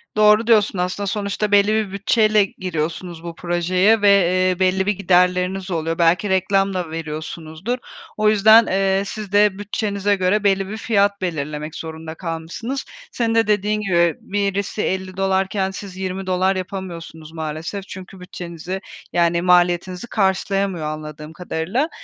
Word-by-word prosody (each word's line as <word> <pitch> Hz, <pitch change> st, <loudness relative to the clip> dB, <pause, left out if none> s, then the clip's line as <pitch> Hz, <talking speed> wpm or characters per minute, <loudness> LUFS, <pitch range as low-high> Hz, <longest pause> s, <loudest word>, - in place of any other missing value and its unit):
Doğru 215 Hz, +2 st, +5 dB
diyorsun 210 Hz, -4 st, +3 dB
aslında. 180 Hz, +3 st, -2 dB
Sonuçta 205 Hz, +1 st, -2 dB
belli 205 Hz, +1 st, +4 dB
bir 215 Hz, -3 st, 0 dB
bütçeyle 215 Hz, +1 st, +3 dB
giriyorsunuz 170 Hz, -2 st, -5 dB
bu 170 Hz, -1 st, -7 dB
projeye 180 Hz, +5 st, +2 dB
ve, 205 Hz, -, +4 dB
eee, 185 Hz, -1 st, +3 dB
belli 190 Hz, 0 st, +2 dB
bir 210 Hz, -, +2 dB
giderleriniz 180 Hz, 0 st, +1 dB
oluyor. 165 Hz, -1 st, -2 dB
Belki 175 Hz, +4 st, +2 dB
reklam 195 Hz, +1 st, +2 dB
da 175 Hz, -3 st, -3 dB
veriyorsunuzdur. 160 Hz, +6 st, -5 dB, 0.4 s
O 215 Hz, 0 st, +3 dB
yüzden, 220 Hz, +2 st, +6 dB
eee, 195 Hz, 0 st, +1 dB
siz 205 Hz, -1 st, -7 dB
de 205 Hz, -1 st, +3 dB
bütçenize 205 Hz, -1 st, -1 dB
göre 195 Hz, +2 st, +1 dB
belli 195 Hz, -1 st, +2 dB
bir 215 Hz, -, -5 dB
fiyat 200 Hz, -3 st, +1 dB
belirlemek 150 Hz, -3 st, -4 dB
zorunda 160 Hz, 0 st, -7 dB
kalmışsınız. 170 Hz, +11 st, -5 dB, 0.3 s
Senin 230 Hz, -2 st, -1 dB
de 225 Hz, -1 st, +3 dB
dediğin 210 Hz, +1 st, +1 dB
gibi 170 Hz, -5 st, +2 dB
birisi 200 Hz, +1 st, -2 dB
$50 190 Hz, 0 st, 0 dB
iken 190 Hz, 0 st, -2 dB
siz 190 Hz, -1 st, -9 dB
$20 190 Hz, 0 st, -1 dB
yapamıyorsunuz 175 Hz, -4 st, -7 dB
maalesef. 160 Hz, +5 st, -5 dB
Çünkü 190 Hz, 0 st, -10 dB
bütçenizi 180 Hz, +1 st, -7 dB, 0.3 s
yani 170 Hz, 0 st, +2 dB
maliyetinizi 180 Hz, +2 st, +2 dB
karşılayamıyor 195 Hz, -4 st, 0 dB
anladığım 155 Hz, 0 st, -7 dB
kadarıyla. 180 Hz, -, -2 dB
190 Hz, 140 wpm, -20 LUFS, 170-205 Hz, 0.4 s, yüzden